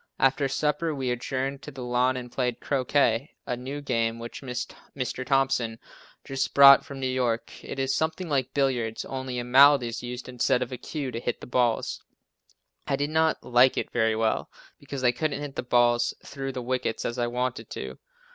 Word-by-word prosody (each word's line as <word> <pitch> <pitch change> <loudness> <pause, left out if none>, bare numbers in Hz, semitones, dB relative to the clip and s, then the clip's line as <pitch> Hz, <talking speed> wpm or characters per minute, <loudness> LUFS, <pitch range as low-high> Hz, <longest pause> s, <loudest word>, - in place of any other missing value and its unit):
After 135 +1 +3
supper 150 +3 0
we 130 -2 -1
adjourned 135 +3 -3
to - - -8
the 135 -3 -8
lawn 125 +1 +1
and 125 -1 -7
played 125 -2 -1
croquet, 135 -1 +1
a 125 - -2
new 135 +4 -6
game 115 -4 0
which 115 0 -8
Mr. 130 0 -5
Thompson 130 -4 +1 0.5
just 135 0 -3
brought 140 0 +9
from 140 -1 -9
New 130 - -2
York. 125 -3 -1
It - - -7
is 135 0 0
something 160 +3 -1
like 135 -4 0
billiards, 125 -5 0
only 130 -1 -4
a 120 - -2
mallet 135 +2 +6
is 115 -1 -4
used 125 0 -6
instead 125 0 +1
of 125 - -8
a 125 - -4
cue 140 -1 -4
to 115 - -4
hit 120 0 -3
the - - -9
balls. 120 -2 0 0.9
I 140 - +1
did 145 +2 -2
not 160 0 +2
like 125 +1 +4
it - - -2
very 110 -2 +2
well, 110 0 0 0.3
because 140 -2 -6
I 125 - +5
couldn't 155 +3 -2
hit 145 -2 -6
the - - -1
balls 120 -1 +2
through 135 -1 -5
the 125 - -4
wickets 125 -2 -2
as 120 +1 -3
I 120 - +1
wanted 125 +1 -3
to. - - -7
130 Hz, 195 wpm, -26 LUFS, 120-140 Hz, 0.9 s, brought